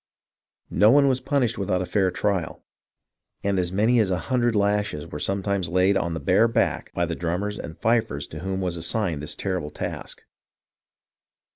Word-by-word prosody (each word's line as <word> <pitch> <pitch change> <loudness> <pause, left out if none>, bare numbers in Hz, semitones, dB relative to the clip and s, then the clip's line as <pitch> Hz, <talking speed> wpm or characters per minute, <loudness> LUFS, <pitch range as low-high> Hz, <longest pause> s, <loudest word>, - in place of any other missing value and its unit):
No 105 - +5
one 140 +3 +6
was 130 -1 +1
punished 125 -5 0
without 90 -2 0
a - - -4
fair 95 0 +1
trial, 95 -3 -2 0.8
and 100 -1 +1
as 90 -1 -1
many 110 +5 +3
as 105 -4 +2
a 90 - +1
hundred 120 +2 0
lashes 100 -6 0
were - - -7
sometimes 100 -2 -1
laid 95 +3 +3
on 85 -3 -1
the - - -3
bare 95 +9 +4
back 115 - 0
by 85 - +1
the 85 - -3
drummers 90 +5 -2
and 80 +1 -7
fifers 110 -9 0
to - - -7
whom 95 +1 -3
was 90 -2 -2
assigned 85 -2 -1
this 75 - -5
terrible 90 -6 -3
task. - - -6
95 Hz, 175 wpm, -24 LUFS, 90-110 Hz, 0.8 s, one